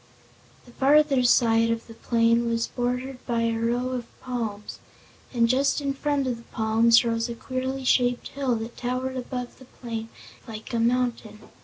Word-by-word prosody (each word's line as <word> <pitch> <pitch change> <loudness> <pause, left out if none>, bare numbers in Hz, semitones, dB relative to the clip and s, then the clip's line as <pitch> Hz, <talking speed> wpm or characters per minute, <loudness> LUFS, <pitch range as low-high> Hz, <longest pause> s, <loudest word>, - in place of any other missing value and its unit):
The 245 - -16
farther 280 +1 +4
side 230 -2 +4
of 230 0 -2
the 225 - -12
plain 230 +1 +2
was 230 0 0
bordered 250 +1 -3
by 235 -1 0
a 230 -1 0
row 240 +2 0
of 250 -2 -4
palms, 225 -5 -5 0.5
and 235 -2 +3
just 270 +5 +2
in 280 -1 -1
front 285 0 -1
of 250 -2 -1
the 230 - -14
palms 225 +2 +4
rose 230 0 -1
a 235 - -4
queerly 260 +2 -4
shaped 245 -1 +2
hill 270 -3 -1
that 225 +1 -6
towered 255 +1 -2
above 250 -1 -5
the 260 - -13
plain 230 -3 -7 0.4
like 220 +1 -8
a 230 - +1
mountain. 235 -2 0
240 Hz, 170 wpm, -25 LUFS, 230-255 Hz, 0.5 s, farther